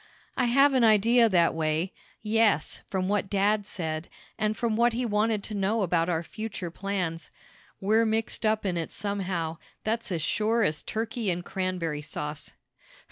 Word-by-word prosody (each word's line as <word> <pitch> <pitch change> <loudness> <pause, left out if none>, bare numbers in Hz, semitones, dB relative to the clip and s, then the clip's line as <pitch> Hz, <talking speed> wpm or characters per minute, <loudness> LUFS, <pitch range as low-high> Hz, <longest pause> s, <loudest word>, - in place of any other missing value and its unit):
"I - - +2
have 275 +4 +5
an 255 -2 +3
idea 230 +2 +5
that 175 -4 +3
way 160 +3 -1 0.3
yes, 215 -6 +2
from 185 -1 -1
what 200 -1 0
dad 205 +1 +1
said, 160 -4 -4 0.3
and 215 +1 -1
from 230 -2 0
what 235 +1 +3
he 245 +2 -1
wanted 215 -1 +1
to 215 - -6
know 205 +2 +1
about 170 -1 +1
our 165 -1 0
future 210 -3 -6
plans. 180 -4 -3 0.5
We're 220 +3 +3
mixed 220 +1 -1
up 215 -1 +1
in 180 -3 0
it 165 - -2
somehow, 185 -5 -3 0.2
that's 225 -1 -1
as 165 -4 -1
sure 220 +5 +1
as 155 -6 0
turkey 225 -1 -2
and 175 0 -2
cranberry 180 -5 -2
sauce." 150 0 -5
200 Hz, 165 wpm, -27 LUFS, 170-220 Hz, 0.5 s, have